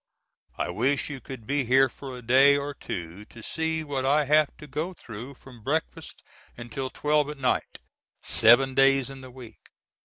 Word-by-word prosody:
I - - -2
wish 140 +2 0
you 135 -3 -7
could 130 -5 -9
be 140 +3 0
here 130 +2 +4
for 130 +1 -9
a 125 - -11
day 135 +4 +5
or 145 +1 -4
two 90 -6 -7
to 110 +1 -14
see 160 +3 -2
what 140 -3 -3
I 145 +3 +3
have 150 +1 +4
to - - -11
go 155 +6 -4
through 120 +3 -9
from 125 -3 -15
breakfast 150 +8 -4 0.3
until 120 +3 -5
twelve 150 +1 0
at 150 - -7
night, 130 -2 -1 0.5
seven 130 +4 +5
days 135 0 +3
in 135 -1 -10
the 130 - -11
week. 125 -2 -13
135 Hz, 175 wpm, -26 LUFS, 125-145 Hz, 0.5 s, day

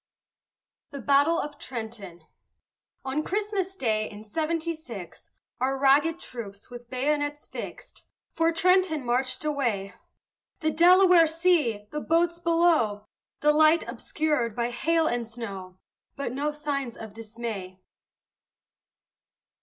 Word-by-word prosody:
THE 280 - -7
BATTLE 285 +5 +3
OF 295 0 -5
TRENTON 220 -8 -7 0.8
On 270 +3 -1
Christmas 395 +1 -2
day 215 - 0
in 210 0 -10
seventy 320 +7 -2
six, 230 - -10 0.3
Our 265 +2 0
ragged 290 +5 +4
troops, 210 - -8
with 240 -1 -10
bayonets 290 +3 -1
fixed, - - -9 0.3
For 330 0 +2
Trenton 355 -4 +2
marched 255 +3 -1
away. 235 -10 -1 0.7
The 315 -1 +1
Delaware 355 0 +6
see! 315 - +1
the 300 - -3
boats 340 +2 +1
below! 330 -12 +2 0.4
The 300 0 +5
light 310 +2 +4
obscured 295 -8 -1
by 235 0 -1
hail 325 +6 +1
and 240 -5 -1
snow! 195 -6 -7 0.4
But 280 -4 -3
no 290 +3 -1
signs 285 -5 -3
of 220 -2 -9
dismay. 215 -4 -7
280 Hz, 115 wpm, -27 LUFS, 230-325 Hz, 0.8 s, Delaware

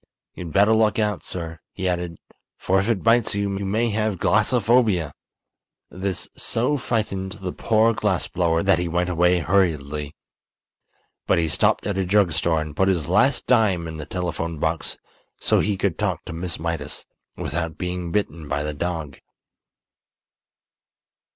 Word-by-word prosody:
You'd 85 -3 -7
better 100 +5 +4
look 110 -1 +3
out, 105 -3 0
sir," 80 -2 -5
he 95 - -3
added, 90 -2 -2 0.4
"for 95 +1 +2
if 100 +4 -1
it 110 -5 0
bites 115 -1 +3
you, 100 -1 -1
you 100 - -3
may 115 +4 +1
have 105 -2 0
glassophobia!" 110 - +2 0.8
This 95 0 -3
so 125 +6 0
frightened 105 -7 -2
the 95 -4 -5
poor 115 +1 +2
glass 105 -5 0
blower 85 -1 +1
that 95 -3 +3
he 90 - -1
went 90 +2 0
away 90 +1 +3
hurriedly. 75 -6 0 1.1
But - - +3
he 85 -1 +2
stopped 75 - +1
at 100 -2 -1
a - - +2
drug 95 -1 +3
store 80 +1 +1
and 75 -1 -6
put 95 +4 +2
his 85 -4 0
last 105 +10 +3
dime 100 -9 +3
in 80 -1 -6
the 75 - -7
telephone 85 -2 -3
box 80 +2 -2 0.4
so - - +2
he 105 -1 0
could 95 -3 -1
talk - - -1
to - - -6
Miss 85 +1 -4
Mydas 80 -3 -4 0.3
without 80 +1 -3
being 90 -1 -3
bitten 85 -5 -2
by 70 0 -1
the 75 0 -3
dog. 80 -2 -4
90 Hz, 160 wpm, -23 LUFS, 80-105 Hz, 1.1 s, better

